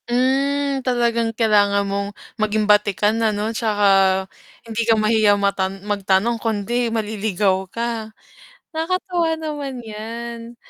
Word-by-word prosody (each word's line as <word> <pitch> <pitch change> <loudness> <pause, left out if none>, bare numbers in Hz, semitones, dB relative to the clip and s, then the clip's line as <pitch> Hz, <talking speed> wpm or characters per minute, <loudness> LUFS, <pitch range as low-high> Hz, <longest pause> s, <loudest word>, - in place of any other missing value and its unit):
Mm, 275 +2 +1
talagang 235 -2 +1
kailangan 205 -3 +3
mong 200 0 -2 0.3
maging 215 0 +1
batikan, 210 +1 +2
ano, 215 0 0
tsaka 215 -3 0 0.8
hindi 230 0 -3
ka 225 - +5
mahiya 215 -1 +3
mata 200 -1 0
magtanong 200 +3 0
kundi 230 +2 -1
maliligaw 205 -4 -1
ka 230 0 -3 0.6
nakakatuwa 345 +1 -1
naman 295 -4 -5
yan. 230 +2 -7
220 Hz, 105 wpm, -21 LUFS, 205-240 Hz, 0.8 s, ka